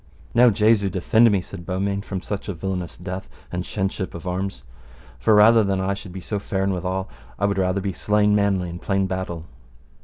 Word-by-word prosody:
Now 120 +1 +7
Jesu 105 -1 +3
defend 110 +6 +4
me, 100 -3 +2
said 90 0 -9
Beaumains, 100 +2 -2
from 95 -2 -4
such 105 0 -4
a 100 - -3
villainous 90 0 -4
death 95 +2 -6 0.2
and 90 0 -2
shenship 95 -1 -3
of 85 - -8
arms. 90 -4 -3 0.6
For 110 - +4
rather 110 +2 +7
than 100 -1 0
I 95 +1 0
should 100 -1 -8
so 105 +3 -2
be - - -16
faren 95 0 0
withal, 95 +1 -2 0.3
I 100 - +1
would 100 -1 0
rather 95 +1 +1
be 95 0 -2
slain 105 +3 +2
manly 100 -3 +2
in 85 +1 -7
plain 95 0 0
battle. 95 -3 -4
95 Hz, 195 wpm, -23 LUFS, 90-100 Hz, 0.6 s, Now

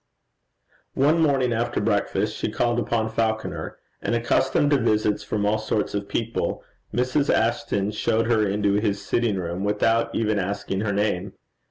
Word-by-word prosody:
One 150 +5 +3
morning 135 -5 +2
after 115 +1 -1
breakfast 105 0 0
she - - -2
called 120 +2 +1
upon 115 -1 0
Falconer; 110 0 -2 0.2
and 120 - 0
accustomed 130 +4 +2
to 145 - +5
visits 110 -3 +1
from 105 -1 -2
all 105 +1 +2
sorts 110 -1 -1
of 100 0 -3
people, 115 0 -2 0.3
Mrs. 125 +4 +1
Ashton 110 -3 0
showed 110 +1 0
her 110 -2 +2
into 100 0 +1
his 100 -2 0
sitting 115 0 +1
room 90 0 -3
without 115 +3 +1
even 110 -2 +1
asking 100 0 -2
her 105 -1 -1
name. 100 -2 -1
110 Hz, 155 wpm, -24 LUFS, 105-120 Hz, 0.3 s, to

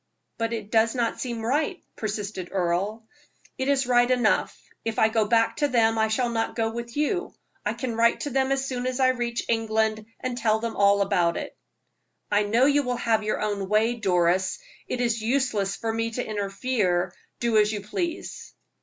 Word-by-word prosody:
"But 230 0 -1
it 215 -3 -5
does 225 +1 +3
not 235 -2 -1
seem 235 -3 -4
right," 295 +8 0 0.2
persisted 205 -4 -4
Earle. 195 +4 -1 0.5
"It 260 - -1
is 275 -2 +2
right 245 0 +4
enough; 250 -1 +2 0.3
if 225 -1 -3
I 220 - +4
go 220 -1 +1
back 230 0 +2
to 295 - +2
them 225 -4 +2
I 220 - +3
shall 240 +3 0
not 225 -1 -1
go 225 -1 0
with 235 +2 -6
you. 360 +6 -1 0.3
I - - -1
can 250 -4 -3
write 230 +1 +3
to 290 - -3
them 265 +1 +1
as 270 0 +1
soon 255 -2 -3
as 255 +1 -2
I 260 -1 +5
reach 240 -2 -1
England, 220 -1 0
and 255 -1 -3
tell 220 -2 +2
them 230 0 -4
all 200 0 +4
about 175 -3 +1
it." - - -6 0.8
"I 205 0 +4
know 225 +5 +3
you 290 +1 +4
will 250 -2 -2
have 225 -2 +1
your 215 0 -2
own 205 -2 -2
way, 220 +3 +3
Doris. 185 -4 +1 0.3
It 245 - -2
is 230 -2 0
useless 220 -5 0
for 225 -1 -3
me 225 0 -1
to 245 - -2
interfere; 200 -3 -1 0.3
do 235 -2 +2
as 210 0 +3
you 210 -2 -3
please." 335 - -5
225 Hz, 195 wpm, -25 LUFS, 210-245 Hz, 0.8 s, I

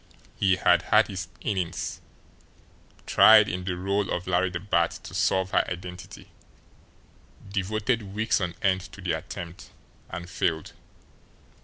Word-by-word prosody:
He 95 -2 +3
had 90 -2 +4
had 105 +1 +5
his 95 -4 -5
innings, 95 -5 -3 1.0
tried - - +7
in 90 0 -4
the 90 -2 -2
role 100 +2 -1
of 90 - -2
Larry 90 +1 +1
the 85 -1 -4
Bat 85 -3 +1
to - - -10
solve 95 0 +1
her - - +3
identity, 90 0 -8 1.2
devoted 105 +4 -1
weeks 110 -1 +1
on 90 -1 -2
end 95 -1 +2
to - - -11
the - - -1
attempt 85 0 -6 0.4
and 85 +1 -6
failed. 80 -3 -2
95 Hz, 135 wpm, -26 LUFS, 90-100 Hz, 1.2 s, tried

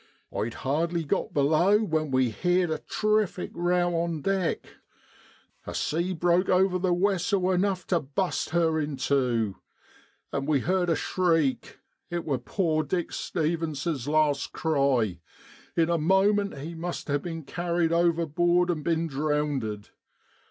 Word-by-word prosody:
I'd 110 +3 -2
hardly 165 +5 -1
got 145 - -1
below 155 +8 +3
when 155 -5 -1
we 130 -2 +2
heerd 175 - +1
a 155 - -1
terrific 215 -4 0
' - - -20
row 175 0 +1
' - - +1
on 165 -4 -3
deck; 195 -3 0 1.0
a - - -5
sea 170 +4 -1
broke 175 +1 +2
over 185 0 +3
the 180 0 +1
wessel 190 +1 +1
enough 185 0 0
to 175 - +1
bust 160 +7 -2
her 160 -1 +2
in 145 -2 -3
tew. 125 -7 0 0.8
An' 140 0 -2
we 145 -4 +2
heerd 180 +3 +1
a 165 - +3
shriek. 165 -5 0 0.3
It 175 -1 -3
w 150 - -4
r - - +3
or - - -10
poor 160 +2 0
Dick 170 +4 -2
Stevens's 160 -4 -2
last 150 -2 +1
cry; 135 - +1 0.6
in 165 0 +3
a 170 - +1
moment 195 +2 +2
he 155 +5 -6
must 170 +1 -5
ha' 145 -1 0
bin 165 -1 -6
carried 170 +2 -1
overboard 175 +1 +2
an' 160 -3 -3
bin 165 +1 0
drownded. 145 -8 -2
165 Hz, 150 wpm, -27 LUFS, 145-180 Hz, 1.0 s, below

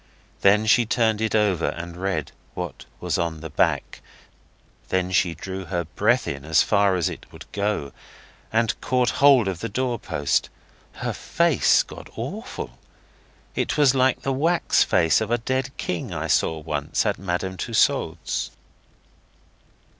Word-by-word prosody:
Then 105 +2 +5
she 120 +3 +5
turned 110 -2 +1
it 110 0 0
over 100 -6 +2
and 85 0 -5
read 90 -5 -2 0.2
what - - -6
was - - -1
on 80 -2 -2
the 80 - -7
back. - - 0 0.9
Then 95 0 0
she 85 -1 +2
drew 95 +3 -6
her 85 +1 -2
breath 80 - +1
in 70 -1 -4
as 80 +1 +3
far 100 -2 +3
as 90 -3 +1
it - - -7
would - - -11
go, 100 -8 -1 0.6
and 115 0 +1
caught 125 -1 +1
hold 135 -7 +6
of 95 -3 -3
the 115 - -4
door 125 +1 -1
post. 75 -7 0 0.4
Her - - -3
face - - +3
got - - -11
awful. - - -6 0.7
It - - -1
was 145 -3 +5
like 130 -1 +2
the 135 - 0
wax 165 +6 +2
face 85 +1 +3
of 110 - -2
a 120 - +2
dead 130 +3 -1
king 90 - -3
I - - -3
saw 80 - +1
once 75 -2 -2
at - - 0
Madame 95 0 -2
Tussaud's. 105 - 0
95 Hz, 155 wpm, -24 LUFS, 85-115 Hz, 0.9 s, hold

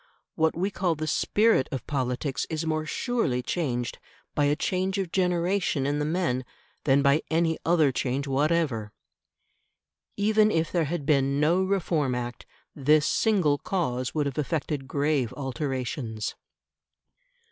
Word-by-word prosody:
What 160 0 +1
we 190 +4 0
call 180 -4 0
the 155 +1 -3
"spirit" 205 +1 +2
of 130 -4 -4
politics 135 0 -2
is 160 0 -2
more 155 -1 -1
surely 155 - -1
changed 125 -9 -2 0.3
by 145 - +2
a 145 +1 +3
change 185 +4 -1
of 190 -4 -2
generation 180 -4 +1
in 145 +1 0
the 150 - 0
men 155 -6 0 0.4
than 140 -1 +4
by 140 +2 +4
any 165 0 +1
other 160 -5 +4
change 130 +2 -1
whatever. 140 -6 0 1.3
Even 215 +1 +4
if 165 -5 0
there 170 -3 +1
had 150 -1 -3
been 140 -1 +2
no 165 +5 +3
Reform 170 -8 0
Act, 120 0 -5 0.3
this 150 +1 +3
single 180 -10 +2
cause 130 -9 -2
would 150 -2 +1
have 140 0 -3
effected 150 -2 -2
grave 140 -4 0
alterations. 130 -4 -3
150 Hz, 140 wpm, -27 LUFS, 135-170 Hz, 1.3 s, than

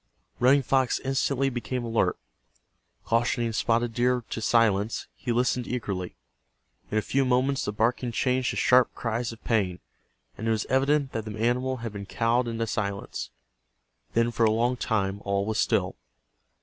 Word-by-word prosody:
Running 135 +3 +5
Fox 130 -1 +2
instantly 135 0 0
became 125 0 -3
alert. 115 -1 +1 0.9
Cautioning 115 0 +1
Spotted 115 +1 +1
Deer 125 +1 +1
to 115 - -3
silence, 110 -2 +2
he 120 - -4
listened 125 +1 +1
eagerly. 100 -7 -3 0.7
In 110 - -1
a 110 - +1
few 135 0 +1
moments 130 +2 +1
the - - -1
barking 120 +3 0
changed 125 +2 +1
to - - -3
sharp 125 0 +4
cries 115 0 -2
of 115 - -13
pain, 95 -6 0 0.6
and 110 - -3
it - - +2
was 110 -1 0
evident 140 +1 +2
that 110 -1 -4
the 110 0 -6
animal 125 +3 0
had 110 - -4
been 100 -1 -7
cowed 115 +4 +1
into 115 0 -2
silence. 100 -3 -3 0.9
Then 115 +1 +3
for 115 - 0
a 110 - +5
long 120 +3 +1
time 100 -4 -1
all 100 0 0
was 110 +1 -1
still. 100 -5 +1
115 Hz, 160 wpm, -27 LUFS, 110-125 Hz, 0.9 s, Running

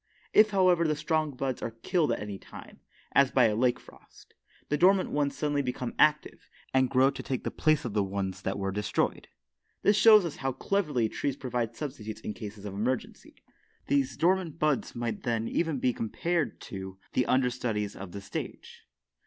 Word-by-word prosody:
If, 215 0 +7
however, 185 -4 +3
the 155 - +1
stronger 155 -1 -1
buds 130 -1 -3
are - - -2
killed 170 -4 +1
at - - -1
any 105 -2 -6
time, - - -13 0.3
as 140 -1 +5
by 130 -2 +4
a 110 -2 +2
late 125 +2 +2
frost, - - -18 0.4
the 150 - +2
dormant 185 +5 +4
ones 145 -1 0
suddenly 145 -1 0
become 125 -2 -3
active, 150 0 +2 0.2
and 130 -1 +3
grow 135 +1 +4
to - - -7
take 130 - -3
the - - -3
place 155 -1 +1
of 115 - -4
the 105 -1 +2
ones 95 -1 -3
that 95 - -2
were 95 -1 -2
destroyed. 105 +1 -1 0.6
This 205 - +5
shows 215 -2 +7
us 165 - -5
how 135 -1 -2
cleverly 150 - 0
trees 135 +4 -2
provide 120 -3 -3
substitutes 120 -7 -6
for 105 - -4
cases 105 -2 -8
of 100 - -5
emergency. 120 +6 -3 0.5
These 135 -3 +1
dormant 175 -2 +1
buds 150 -5 0
then 120 -1 -3 0.3
might - - -5
even 160 -4 0
be 125 -1 +1
compared 155 +5 -2
to 95 -1 -7 0.2
the 125 - +1
understudies 120 -5 0
of 95 -2 -8
the 100 - -7
stage. - - -7
130 Hz, 185 wpm, -29 LUFS, 110-155 Hz, 0.6 s, If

